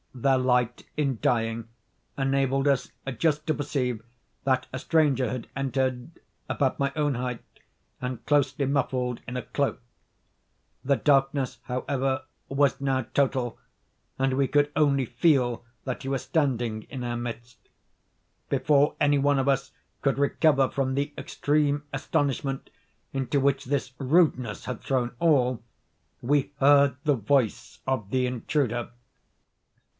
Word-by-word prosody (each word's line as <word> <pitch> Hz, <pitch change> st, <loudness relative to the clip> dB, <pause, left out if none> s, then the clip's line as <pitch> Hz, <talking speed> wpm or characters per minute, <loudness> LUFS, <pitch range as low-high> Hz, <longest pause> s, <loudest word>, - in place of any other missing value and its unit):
Their 130 Hz, +1 st, +2 dB
light, 125 Hz, -1 st, +1 dB
in 135 Hz, -6 st, 0 dB
dying, 115 Hz, -1 st, 0 dB, 0.5 s
enabled 135 Hz, 0 st, +1 dB
us 135 Hz, -2 st, +1 dB, 0.3 s
just 155 Hz, +1 st, +1 dB
to 155 Hz, -, +3 dB
perceive 130 Hz, -6 st, -2 dB, 0.4 s
that 130 Hz, -1 st, +1 dB
a 130 Hz, -, -3 dB
stranger 140 Hz, -6 st, +2 dB
had 125 Hz, 0 st, -5 dB
entered, 130 Hz, +1 st, -2 dB, 0.3 s
about 135 Hz, -3 st, 0 dB
my 140 Hz, 0 st, +1 dB
own 145 Hz, -3 st, +1 dB
height, 125 Hz, -1 st, -3 dB, 0.6 s
and 125 Hz, -2 st, -4 dB
closely 145 Hz, -1 st, +2 dB
muffled 130 Hz, -3 st, -1 dB
in 125 Hz, +1 st, -4 dB
a 125 Hz, -, -3 dB
cloak. 140 Hz, -1 st, -1 dB, 1.0 s
The 140 Hz, +1 st, +3 dB
darkness, 135 Hz, +1 st, +2 dB
however, 130 Hz, +1 st, -1 dB, 0.3 s
was 140 Hz, 0 st, +2 dB
now 135 Hz, -2 st, +1 dB
total; 130 Hz, -4 st, 0 dB, 0.6 s
and 135 Hz, 0 st, +1 dB
we 135 Hz, 0 st, +2 dB
could 145 Hz, +1 st, +2 dB
only 140 Hz, -3 st, +3 dB
feel 120 Hz, -1 st, +2 dB, 0.2 s
that 130 Hz, -, -3 dB
he 135 Hz, -, -4 dB
was 135 Hz, -1 st, -1 dB
standing 120 Hz, -8 st, 0 dB
in 130 Hz, -3 st, -5 dB
our 120 Hz, -1 st, -2 dB
midst. 120 Hz, -2 st, -7 dB, 0.8 s
Before 140 Hz, +2 st, +3 dB
any 145 Hz, 0 st, +3 dB
one 140 Hz, 0 st, +3 dB
of 135 Hz, -, 0 dB
us 135 Hz, -1 st, +1 dB, 0.3 s
could 140 Hz, -1 st, +1 dB
recover 140 Hz, -1 st, +3 dB
from 130 Hz, -1 st, -1 dB
the 145 Hz, +1 st, -1 dB
extreme 145 Hz, 0 st, 0 dB
astonishment 135 Hz, 0 st, -1 dB, 0.4 s
into 135 Hz, +1 st, 0 dB
which 140 Hz, 0 st, +1 dB
this 130 Hz, -1 st, -2 dB
rudeness 135 Hz, -6 st, +2 dB
had 125 Hz, -3 st, -5 dB
thrown 125 Hz, -3 st, 0 dB
all, 130 Hz, -7 st, +2 dB, 0.6 s
we 140 Hz, +2 st, +1 dB
heard 140 Hz, -1 st, +5 dB
the 145 Hz, -2 st, +3 dB
voice 120 Hz, 0 st, 0 dB
of 125 Hz, -7 st, -1 dB
the 130 Hz, +2 st, +1 dB
intruder. 125 Hz, 0 st, -1 dB
135 Hz, 135 wpm, -26 LUFS, 125-140 Hz, 1.0 s, heard